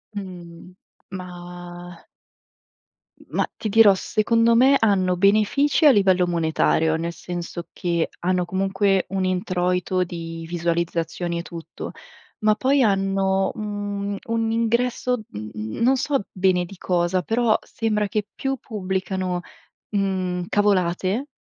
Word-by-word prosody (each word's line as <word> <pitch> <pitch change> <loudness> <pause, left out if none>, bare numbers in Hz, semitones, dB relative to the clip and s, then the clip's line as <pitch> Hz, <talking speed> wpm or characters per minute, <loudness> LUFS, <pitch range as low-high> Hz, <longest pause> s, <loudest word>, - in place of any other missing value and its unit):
Mhmm. 180 -2 -9 0.4
Mah 175 -1 -9 1.2
mah, - - 0
ti 215 - -3
dirò, 215 -1 +7
secondo 230 +4 +2
me 265 +4 +6
hanno 190 -4 +2
benefici 215 - +3
a 295 - +9
livello 190 -5 +4
monetario, 160 -1 +2
nel 170 +1 -3
senso 175 0 -6
che 170 -2 -1
hanno 180 0 0
comunque 190 +1 +1
un 190 -1 -1
introito 180 0 0
di 165 -2 -6
visualizzazioni 170 0 -2
e - - -2
tutto. 170 -1 -8 0.5
Ma 215 0 +3
poi 270 +4 +2
hanno 195 -2 +2
un 205 -1 -3
un 225 0 -1
ingresso 235 +2 0
mhmm, 105 +1 -7
mhmm, 110 - -5
non 260 +3 +5
so 280 -3 0
bene 185 -1 +2
di 195 - -11
cosa, 180 0 0
però 225 +3 +2
sembra 210 -2 -1
che 205 +1 -2
più 270 0 -2
pubblicano, 190 -4 -3 0.5
mhmm, 185 -3 -1
cavolate, 195 +4 +1
190 Hz, 120 wpm, -23 LUFS, 175-215 Hz, 1.2 s, a